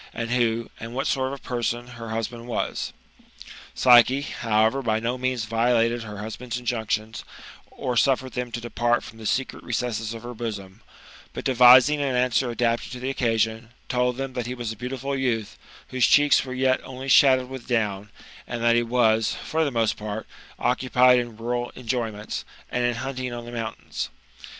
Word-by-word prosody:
And 115 0 -3
who, 115 -2 0
and 115 +2 -7
what 135 - -1
sort 130 -1 +1
of 135 - -4
a - - -21
person, 120 0 -2
her 115 -2 -8
husband 115 +1 -4
was? 120 - -2 0.8
Psyche, 125 +2 +6
however, 115 -1 +1
by 110 -3 0
no 115 +2 -1
means 130 -2 -1
violated 115 +1 +2
her 105 -2 -8
husband's 115 +3 -5
in 125 - -9
junctions, 110 -2 -2 0.5
or 125 -1 -3
suffered 130 +1 +2
them 125 -1 -4
to 115 - -4
depart 120 0 0
from 110 - -12
the 110 - -4
secret 135 +1 -2
recesses 115 -2 -2
of 115 - -9
her 120 0 -6
bosom; 105 -4 -6 0.5
but - - -5
devising 130 +3 +7
an, 135 -3 0
answer 125 0 +2
adapted 120 0 -1
to 125 - -6
the 130 +2 -2
occasion, 115 -2 0 0.2
told 125 -1 +1
them 135 -1 -4
that 125 -2 -3
he 125 - -4
was 120 -3 -4
a - - -6
beautiful 130 +4 -4
youth, 120 -5 -1 0.3
whose 130 -2 +3
cheeks 145 -1 +5
were 130 - -6
yet 130 0 +2
only 130 +1 -8
shadowed 130 -1 +5
with 130 -2 -9
down, 105 -4 -1 0.4
and 120 -1 -4
that 120 0 +4
he 120 - +4
was, 115 -2 +2
for 160 +1 0
the 150 - +1
most 115 -4 0
part, 105 0 -5 0.3
occupied 125 0 +4
in 120 -3 -5
rural 120 +1 -2
employments, 115 -4 -3 0.3
and 125 0 0
in 120 0 +1
hunting 130 +1 -4
on 120 0 -6
the 120 - -8
moun 115 -2 -4
tains. - - -5
120 Hz, 185 wpm, -24 LUFS, 115-125 Hz, 0.8 s, devising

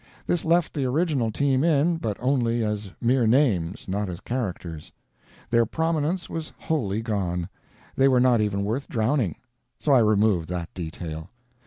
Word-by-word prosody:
This 175 - 0
left 170 0 +2
the 145 - -1
original 140 -3 +1
team 135 +2 +1
in, 165 +1 +3
but 110 -10 -3
only 120 -2 +1
as 105 -1 -3
mere 120 0 +2
names, 105 - +2
not 100 +1 -2
as 85 -1 -6
characters. 90 -10 -5 0.6
Their 115 -1 +4
prominence 160 - -1
was 160 -1 -5
wholly 115 -9 -1
gone; 90 -6 -2 0.5
they 135 - +4
were 130 -2 +4
not 125 -3 +4
even 100 -1 0
worth 115 +7 -2
drowning; 115 - 0 0.4
so 145 - 0
I 135 - +7
removed 105 -6 +2
that 90 -2 -4
detail. 80 -1 -6
115 Hz, 155 wpm, -25 LUFS, 100-140 Hz, 0.6 s, I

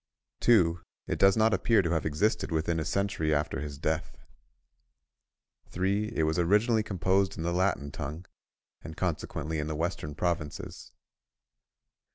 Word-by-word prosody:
2. 90 -8 +4 0.3
It - - -3
does 95 +1 +5
not 110 0 +4
appear 115 -4 +3
to 85 - -1
have 80 -2 0
existed 85 +7 0
within 80 +1 0
a 80 - -2
century 95 -4 0
after 75 -2 -1
his 70 -1 -6
death. 80 +1 -2 1.5
3. 100 +5 -1
It 80 - +1
was 80 +2 +1
originally 105 +6 +3
composed 95 -1 0
in 80 - -4
the 85 +1 -1
Latin 90 -6 0
tongue, 75 +7 -6 0.6
and 80 - -9
consequently 80 -3 -2
in 75 - -2
the 80 - -3
western 80 -2 -3
provinces. 85 -3 -3
85 Hz, 145 wpm, -29 LUFS, 80-100 Hz, 1.5 s, does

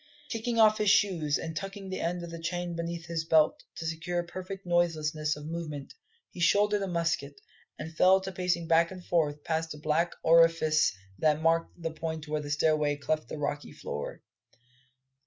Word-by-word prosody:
Kicking 230 +1 -2
off 215 -1 +5
his 210 -1 +3
shoes, 175 -9 +3
and 160 0 -5
tucking 195 +2 -6
the 185 - -3
end 175 +1 -2
of 170 - -7
the 165 0 -7
chain 175 0 -3
beneath 170 0 -4
his 165 -1 -2
belt 160 -1 +3
to 165 - -6
secure 175 +2 -2
perfect 185 +2 -7
noiselessness 155 -3 +1
of 150 0 -9
movement, 155 -3 -5 0.4
he - - -11
shouldered 205 +4 +3
a 195 - -1
musket, 165 -5 -1 0.4
and 160 +1 -7
fell 185 +3 +6
to 190 0 -5
pacing 180 -2 -1
back 165 0 +4
and 185 -2 -10
forth 150 -4 0
past 160 0 -2
the - - -10
black 155 +3 0
orifice 165 -2 +5 0.3
that 155 -1 +3
marked 165 +1 +1
the 165 -1 -3
point 160 -1 -5
where 150 0 -1
the 145 - -7
stairway 150 0 +2
cleft 155 +2 -2
the - - -5
rocky 145 0 -3
floor. 75 - -6
165 Hz, 180 wpm, -29 LUFS, 155-175 Hz, 0.4 s, fell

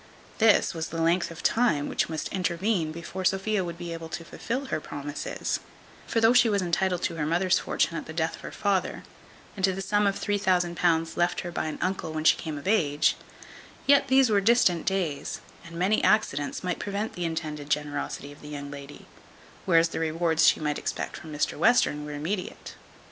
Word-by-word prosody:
This 220 -3 +4
was 165 -1 -3
the 165 - -5
length 170 +2 +2
of 165 0 -10
time 165 -12 +2
which - - -1
must 160 -1 -3
intervene 180 -1 0
before 170 +3 -6
Sophia 195 +2 +1
would 170 -1 -6
be 170 -1 -5
able 165 -1 -7
to 165 +1 -6
fulfil 260 +10 -4
her 155 - 0
promises; 145 0 -4 0.5
for 230 - +1
though 225 +1 +5
she 240 -2 +5
was 205 -1 +2
intitled 180 +1 0
to 165 - -1
her 150 - -1
mother's 180 +3 +2
fortune 165 - 0
at - - -5
the - - -6
death 160 0 -1
of - - -15
her - - -7
father, 200 -2 -1 0.5
and 195 - -6
to 190 0 +4
the 190 - -5
sum 205 +1 +2
of 195 - 0
£3000 175 -4 +1
left 175 0 +1
her 175 - -6
by 170 - -2
an 155 - -4
uncle 185 -3 -2
when 155 0 -3
she - - +6
came 155 -3 -5
of 145 - -8
age; 155 -9 +3 0.7
yet 280 0 +5
these 265 -2 +4
were 200 -1 +4
distant 195 -6 +3
days, 175 -8 -1 0.2
and 170 -1 -11
many 190 +5 +2
accidents 145 -10 +1
might 180 -2 -2
prevent 205 +2 -3
the 180 - -4
intended 155 -3 -4
generosity 145 -1 -2
of 145 - -15
the 150 - -10
young 145 -1 -6
lady; 140 0 -10 0.6
whereas 165 -2 +5
the - - -4
rewards 160 0 +2
she - - +5
might 150 -1 -1
expect - - -4
from 160 - -9
Mr 150 -1 -1
Western 185 -11 +3
were 150 - -6
immediate. 180 +6 -4
170 Hz, 200 wpm, -27 LUFS, 155-195 Hz, 0.7 s, she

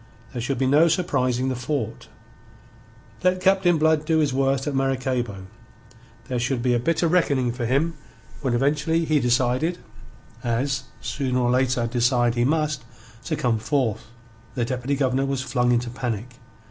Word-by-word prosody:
There 120 - -3
should 130 +3 -2
be 135 - +1
no 145 +5 +5
surprising 130 -7 0
the 130 - -1
fort. 125 -2 -4 1.2
Let 185 0 +3
Captain 185 -2 +3
Blood 155 0 +3
do 160 +1 +1
his 150 -4 +2
worst 135 0 +1
at 145 - -2
Maracaybo, 130 -7 -1 0.8
there 125 -1 -2
should 120 0 -1
be 125 -1 +2
a 120 - +2
bitter 165 +7 +1
reckoning 140 -8 +2
for 120 -1 -3
him 145 +7 +1 0.5
when 130 -4 0
eventually 150 +5 +1
he 155 -1 +2
decided 125 +6 +1 0.7
as, 130 +3 -1 0.2
sooner 130 -3 -2
or 120 -1 +2
later, 125 -1 +1
decide 120 0 +2
he 120 0 +1
must 150 -2 0 0.4
to - - -1
come 115 -3 0
forth. 115 -3 -1 0.5
The 120 -2 0
Deputy 125 +3 -2
Governor 135 0 +1
was 135 -1 -2
flung 125 -2 +1
into 120 0 0
panic. 125 -2 -4
130 Hz, 160 wpm, -24 LUFS, 125-145 Hz, 1.2 s, no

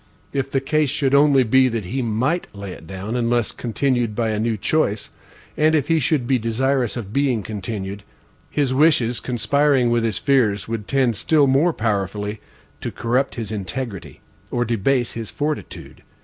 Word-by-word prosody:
If 135 -1 -1
the 135 -1 0
case 150 +1 +1
should 140 -1 0
only 140 -2 +5
be, 130 +3 +4
that 115 -5 -2
he 130 +9 -2
MIGHT 125 +9 0
lay 100 -1 -7
it 80 - -11
down, 95 +6 -5
unless 120 -1 +1
continued 120 -2 -1
by 115 -1 0
a 105 -1 -1
new 115 0 0
choice, 105 -3 0 0.4
and 155 +1 +3
if 145 -1 0
he 165 -1 +4
should 140 -2 +1
be 130 0 +2
desirous 125 +2 0
of 105 -3 -6
being 130 -6 +1
continued, 100 -1 -5 0.5
his 140 -3 0
wishes, 130 -5 +3
conspiring 130 0 +2
with 120 -1 +2
his 110 -5 0
fears, 105 -1 +2
would 115 -2 -4
tend 130 -5 +1
still 155 -3 +3
more 140 +6 +3
powerfully 105 - -2 0.4
to - - -3
corrupt 125 +4 0
his 115 -2 -5
integrity, 105 0 -5 0.3
or 120 0 0
debase 120 +2 +1
his 115 -2 -6
fortitude. 150 +1 -5
120 Hz, 170 wpm, -21 LUFS, 110-135 Hz, 0.5 s, only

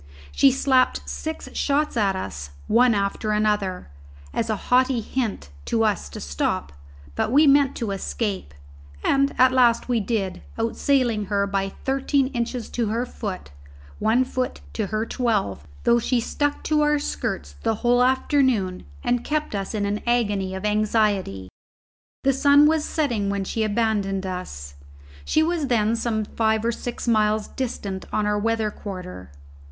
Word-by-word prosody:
She 275 - +5
slapped 265 -1 +2
six 315 0 -5
shots 295 +1 0
at 200 -4 +2
us, 75 - -5 0.2
one 235 +1 +4
after 200 +2 -1
another, 210 - 0 0.4
as 225 - -1
a 215 - +1
haughty 250 +4 +2
hint 225 - -3 0.2
to 225 - +1
us 210 - 0
to - - -8
stop; 70 0 -2 0.4
but 145 - -1
we 295 +4 +6
meant 280 -1 +4
to 225 -5 -3
escape, 195 - -3 0.5
and 275 0 +3
at 255 0 +6
last 245 -3 +3
we 240 -2 +2
did, 200 -4 -2 0.2
outsailing 230 -2 +1
her 200 0 +1
by 195 -1 -1 0.2
thirteen 270 0 +1
inches 240 -2 -3
to 235 -2 -1
her 230 +4 -1
foot 195 - -6 0.5
one 235 +4 +3
foot 255 0 -3
to 215 -3 -2
her 215 +2 -1
twelve 210 - -1 0.2
though 235 0 +4
she 245 +1 +1
stuck 290 +5 -1
to 305 -1 +2
our 295 0 +3
skirts 285 - -3
the 225 -1 +1
whole 245 +1 +4
afternoon 255 -7 +1 0.2
and 245 0 +1
kept 305 -3 -2
us 200 +1 -3
in 205 -1 0
an 205 +1 -2
agony 205 -6 +1
of 190 +2 -5
anxiety. 210 - +1 0.8
The 275 - +3
sun 285 +2 +5
was 310 0 +2
setting 235 -10 -1
when 200 -1 -1
she 220 +3 -2
abandoned 205 -3 0
us: 70 - -6 0.5
she 315 - +2
was 325 -3 0
then 225 -2 +2
some 225 -2 -1
five 220 0 0
or 235 - +2
six 240 +1 -5
miles 215 -2 +2
distant 200 -7 -4
on 210 - 0
our 210 0 +1
weather 220 0 0
quarter. 180 - -8
225 Hz, 160 wpm, -23 LUFS, 200-255 Hz, 0.8 s, we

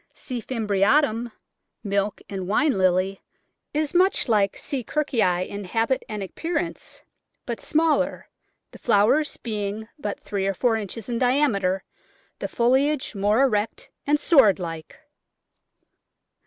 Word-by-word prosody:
C. 250 -4 -5
fimbriatum 225 +2 +1 0.3
— - - -55
Milk 200 0 -1
and 190 -2 -5
wine 280 +8 +2
Lily 185 +1 +1 0.3
— - - -54
is 300 -1 -1
much 370 -2 +3
like 205 -4 +2
C. 275 -4 -4
Kirkii 215 - 0
in 200 0 -6
habit 225 +7 0
and 210 -2 -4
appearance, 325 - -4 0.4
but 235 -2 -4
smaller, 315 0 +1 0.4
the - - -13
flowers 245 +7 +2
being 215 -1 -4
but 205 -7 -4
three 195 -1 -3
or 195 - -1
four 235 +3 +2
inches 215 0 -5
in 235 -2 -2
diameter, 240 -8 +2 0.6
the - - -3
foliage 265 +4 +1
more 210 +5 +2
erect 215 -5 -1 0.2
and 295 +1 +3
sword 270 - +5
like. 165 -4 -7
220 Hz, 130 wpm, -24 LUFS, 200-270 Hz, 0.6 s, sword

